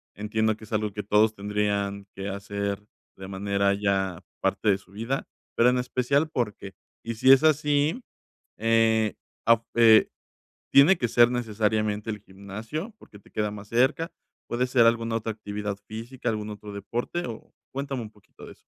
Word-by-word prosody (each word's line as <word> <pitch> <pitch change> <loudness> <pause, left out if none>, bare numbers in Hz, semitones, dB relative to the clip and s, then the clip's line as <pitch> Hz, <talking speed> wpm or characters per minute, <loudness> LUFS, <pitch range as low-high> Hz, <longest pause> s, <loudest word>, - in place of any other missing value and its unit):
entiendo 110 +1 0
que 110 - -15
es 110 - -11
algo 105 -1 0
que 105 +1 -4
todos 105 +2 +3
tendrían 100 -1 -1
que 95 0 -5
hacer 100 0 -3 0.3
de 95 - -8
manera 100 +1 0
ya 95 -3 0 0.2
parte 110 - +1
de 100 - +4
su 100 - -22
vida, 115 +7 -3 0.3
pero 120 +1 +5
en 125 - +2
especial 130 +4 +1
¿por 115 -5 -1
qué? 100 -1 -10 0.3
Y 115 - -3
si 130 +4 +5
es 135 +2 +7
así, 150 - +2 0.6
eh, 110 -1 +3 0.3
afu 115 0 +5
eh, 115 -2 +7 0.6
¿tiene 155 +7 +7
que 120 - 0
ser 120 +1 +6
necesariamente 110 -2 -1
el 105 -1 -3
gimnasio?, 105 - -7
porque 105 - -16
te - - -22
queda 105 -1 -1
más 105 -1 -9
cerca, 135 +8 +2 0.4
¿puede 125 +2 0
ser 125 -2 +4
alguna 115 0 +2
otra 110 0 -3
actividad 105 -1 -4
física, 120 +3 -5
algún 105 -1 -3
otro 105 0 -9
deporte? 120 +11 -3
O 115 -2 -9 0.2
cuéntame 135 -1 -3
un 105 - -10
poquito 105 -2 -16
de - - -11
eso. - - -26
110 Hz, 175 wpm, -26 LUFS, 100-120 Hz, 0.6 s, es